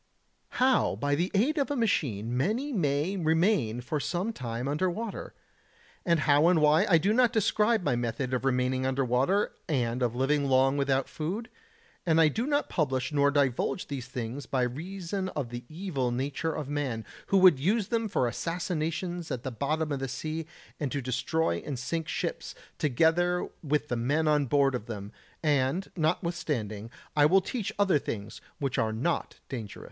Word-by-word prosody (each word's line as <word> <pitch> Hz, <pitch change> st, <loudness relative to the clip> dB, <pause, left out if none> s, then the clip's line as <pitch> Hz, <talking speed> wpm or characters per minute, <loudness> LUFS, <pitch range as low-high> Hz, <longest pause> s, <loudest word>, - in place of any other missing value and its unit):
How 260 Hz, 0 st, +3 dB
by 145 Hz, 0 st, -1 dB
the 170 Hz, +6 st, +1 dB
aid 285 Hz, +10 st, +2 dB
of 280 Hz, -, 0 dB
a 290 Hz, -, -1 dB
machine 125 Hz, -, 0 dB
many 230 Hz, -, 0 dB
may 155 Hz, -, 0 dB
remain 160 Hz, -, +2 dB
for 150 Hz, +5 st, -2 dB
some 185 Hz, +9 st, -2 dB
time 120 Hz, -, -4 dB
under 155 Hz, +6 st, +1 dB
water. 215 Hz, +4 st, -5 dB, 0.7 s
And 170 Hz, -3 st, +2 dB
how 150 Hz, +2 st, +4 dB
and 175 Hz, -2 st, +4 dB
why 150 Hz, +1 st, +4 dB
I 170 Hz, -, +7 dB
do 195 Hz, +7 st, +2 dB
not 245 Hz, 0 st, +4 dB
describe 220 Hz, -1 st, +2 dB
my 125 Hz, -, +1 dB
method 120 Hz, +2 st, -2 dB
of 125 Hz, -, 0 dB
remaining 130 Hz, 0 st, +1 dB
under 130 Hz, +1 st, 0 dB
water 135 Hz, -, +2 dB, 0.2 s
and 125 Hz, -4 st, 0 dB
of 120 Hz, -1 st, 0 dB
living 140 Hz, +3 st, +1 dB
long 135 Hz, +1 st, +4 dB
without 135 Hz, -2 st, +1 dB
food; 200 Hz, +10 st, -4 dB, 0.5 s
and 165 Hz, -2 st, +3 dB
I 160 Hz, -1 st, +6 dB
do 230 Hz, -, -2 dB
not 290 Hz, 0 st, +1 dB
publish 130 Hz, -5 st, -1 dB
nor 145 Hz, -1 st, +3 dB
divulge 140 Hz, +5 st, +1 dB
these 130 Hz, -4 st, -5 dB
things 125 Hz, +1 st, -5 dB
by 130 Hz, -2 st, +1 dB
reason 185 Hz, +8 st, -3 dB
of 135 Hz, -5 st, -2 dB
the 120 Hz, 0 st, -7 dB
evil 155 Hz, -7 st, -2 dB
nature 140 Hz, +6 st, -2 dB
of 150 Hz, -, -4 dB
man, 135 Hz, -7 st, -2 dB, 0.2 s
who 195 Hz, -, +3 dB
would 185 Hz, -7 st, +7 dB
use 200 Hz, -, +1 dB
them 230 Hz, -2 st, 0 dB
for 185 Hz, -, +1 dB
assassinations 170 Hz, -, -3 dB
at 125 Hz, -1 st, -4 dB
the 130 Hz, -, -3 dB
bottom 150 Hz, +6 st, -1 dB
of 140 Hz, -, -1 dB
the 135 Hz, -, -2 dB
sea 155 Hz, +5 st, -4 dB, 0.3 s
and 145 Hz, -4 st, -2 dB
to 140 Hz, -, -2 dB
destroy 130 Hz, -, 0 dB
and 140 Hz, -3 st, -4 dB
sink 160 Hz, +6 st, -3 dB
ships, -, -, -3 dB, 0.2 s
together 165 Hz, +5 st, +2 dB, 0.2 s
with 150 Hz, -1 st, 0 dB
the 120 Hz, -, 0 dB
men 145 Hz, +7 st, +1 dB
on 150 Hz, -2 st, +3 dB
board 140 Hz, +1 st, +3 dB
of 120 Hz, -3 st, -4 dB
them; 105 Hz, -3 st, -6 dB, 0.3 s
and 145 Hz, +4 st, +1 dB
notwithstanding 155 Hz, -, -1 dB, 0.3 s
I 145 Hz, -1 st, +6 dB
will 190 Hz, +4 st, +5 dB
teach 215 Hz, +2 st, -3 dB
other 195 Hz, -7 st, +3 dB
things 105 Hz, -4 st, -6 dB, 0.2 s
which 135 Hz, -3 st, -1 dB
are 110 Hz, -1 st, +1 dB
not 135 Hz, +10 st, -1 dB
dangerous.... 110 Hz, -7 st, -6 dB
150 Hz, 180 wpm, -29 LUFS, 130-180 Hz, 0.7 s, I